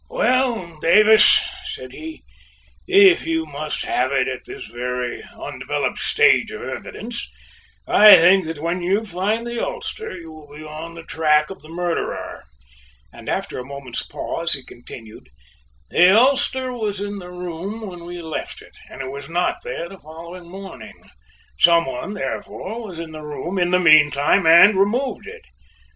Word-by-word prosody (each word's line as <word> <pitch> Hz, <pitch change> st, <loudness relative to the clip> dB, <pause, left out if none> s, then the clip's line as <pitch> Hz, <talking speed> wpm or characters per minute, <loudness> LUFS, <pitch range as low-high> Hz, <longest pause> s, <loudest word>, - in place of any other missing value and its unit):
"Well, 250 Hz, -, 0 dB
Dallas," 215 Hz, +6 st, +7 dB
he -, -, -2 dB, 0.2 s
said, 130 Hz, 0 st, -7 dB, 1.0 s
"if 195 Hz, -3 st, +5 dB
you 160 Hz, 0 st, -1 dB
must 150 Hz, 0 st, -5 dB
have 130 Hz, +2 st, -1 dB
it 135 Hz, -2 st, +1 dB
at 130 Hz, -1 st, -5 dB
this -, -, -9 dB
very 125 Hz, 0 st, -4 dB, 0.2 s
undeveloped -, -, -4 dB
stage -, -, +3 dB
of -, -, -8 dB
the -, -, -6 dB
evidence, -, -, -6 dB, 0.6 s
I 210 Hz, -1 st, +9 dB
think 180 Hz, 0 st, +5 dB
that 160 Hz, -1 st, -5 dB
when 170 Hz, +4 st, -3 dB
you 195 Hz, +5 st, 0 dB
find 210 Hz, +5 st, -2 dB
the 235 Hz, -1 st, -4 dB
ulster 455 Hz, -, -6 dB
you 165 Hz, -2 st, -11 dB
will 150 Hz, -2 st, -14 dB
be 155 Hz, -, -10 dB
on 155 Hz, +2 st, -9 dB
the 165 Hz, -, -10 dB
track 150 Hz, 0 st, +1 dB
of 195 Hz, -, -10 dB
the 155 Hz, -, -16 dB
murderer," 175 Hz, 0 st, -4 dB, 0.7 s
and -, -, -10 dB
after -, -, -3 dB
a -, -, -6 dB
moment's 135 Hz, -2 st, -6 dB
pause 170 Hz, 0 st, -2 dB
he 135 Hz, -, -5 dB
continued: 115 Hz, -, -12 dB, 0.6 s
"The 185 Hz, +4 st, +6 dB
ulster 260 Hz, 0 st, +2 dB
was 210 Hz, -5 st, -3 dB
in 205 Hz, 0 st, -5 dB
the 180 Hz, -1 st, -10 dB
room 180 Hz, +5 st, -6 dB
when 175 Hz, -3 st, -9 dB
we 175 Hz, 0 st, -8 dB
left 160 Hz, -1 st, -6 dB
it -, -, -19 dB, 0.2 s
and 135 Hz, -, -9 dB
it 130 Hz, -, -6 dB
was 140 Hz, +1 st, -9 dB
not 175 Hz, +1 st, 0 dB
there 170 Hz, -, -5 dB
the 195 Hz, +2 st, -13 dB
following 170 Hz, +3 st, -11 dB
morning. 190 Hz, -, -11 dB, 0.5 s
Some 170 Hz, -1 st, +5 dB
one, 135 Hz, +11 st, -5 dB
therefore, 220 Hz, +3 st, -6 dB
was 180 Hz, -4 st, -9 dB
in 165 Hz, -1 st, -7 dB
the 155 Hz, 0 st, -9 dB
room 160 Hz, +5 st, -5 dB
in 175 Hz, 0 st, +1 dB
the 180 Hz, -, +3 dB
meanwhile 155 Hz, +1 st, +4 dB
and 190 Hz, +5 st, +7 dB
removed 245 Hz, -, -1 dB
it. 455 Hz, +1 st, -11 dB
170 Hz, 165 wpm, -20 LUFS, 155-200 Hz, 1.0 s, I